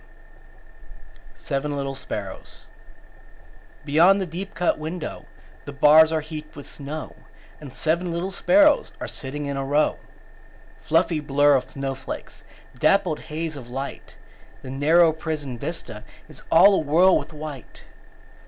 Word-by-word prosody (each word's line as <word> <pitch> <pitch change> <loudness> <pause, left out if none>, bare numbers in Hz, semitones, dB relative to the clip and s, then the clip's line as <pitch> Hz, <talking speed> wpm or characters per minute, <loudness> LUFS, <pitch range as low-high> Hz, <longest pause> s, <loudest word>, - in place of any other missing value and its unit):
_ - - -26
SEVEN 140 +1 -3
LITTLE 135 -1 -3
SPARROWS 135 - -7 1.2
Beyond 170 +7 +5
the 190 - -1
deep 185 +3 -7
cut 175 -1 0
window 155 +1 -6 0.4
The 145 - -7
bars 155 +3 +6
are 160 -1 0
heaped 155 0 -9
with 145 - -10
snow, 150 +2 -7 0.4
And 145 -3 -10
seven 170 +6 -1
little 170 +3 -3
sparrows 295 +8 +3
Are - - -5
sitting 145 +2 -6
in 140 -1 -3
a 135 - -2
row. 145 +3 +1 0.8
Fluffy 165 0 +1
blur 145 0 +3
of 130 -1 0
snowflakes; 135 -1 -6 0.4
Dappled 190 -6 +2
haze 160 0 -5
of 125 -4 -10
light; 135 +3 -7 0.5
The 130 - -7
narrow 160 +4 +4
prison 155 -5 -5
vista - - -6 0.2
Is - - -13
all 190 +1 +6
awhirl 170 +6 +4
with - - -9
white. 150 -4 -9
155 Hz, 135 wpm, -23 LUFS, 140-165 Hz, 1.2 s, bars